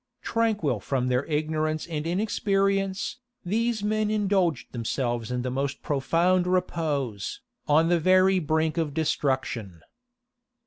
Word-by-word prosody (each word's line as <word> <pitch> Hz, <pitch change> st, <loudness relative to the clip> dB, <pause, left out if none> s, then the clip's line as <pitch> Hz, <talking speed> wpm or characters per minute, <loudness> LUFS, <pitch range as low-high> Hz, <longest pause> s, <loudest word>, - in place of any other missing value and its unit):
Tranquil 210 Hz, -, 0 dB
from 125 Hz, +4 st, -1 dB
their 125 Hz, +2 st, +1 dB
ignorance 155 Hz, 0 st, -1 dB
and 155 Hz, -2 st, -4 dB
inexperience, 195 Hz, +1 st, 0 dB, 0.3 s
these 225 Hz, +3 st, 0 dB
men 215 Hz, 0 st, +1 dB
indulged 195 Hz, -, +1 dB
themselves 120 Hz, -1 st, -2 dB
in 125 Hz, 0 st, -2 dB
the 125 Hz, -, -2 dB
most 135 Hz, +1 st, -3 dB
profound 170 Hz, +6 st, +2 dB
repose, 155 Hz, -, -1 dB, 0.3 s
on 160 Hz, +2 st, +4 dB
the 175 Hz, -1 st, +3 dB
very 185 Hz, +2 st, +4 dB
brink 160 Hz, +1 st, 0 dB
of 150 Hz, -3 st, -2 dB
destruction. 130 Hz, -, -1 dB
160 Hz, 120 wpm, -26 LUFS, 135-190 Hz, 0.3 s, on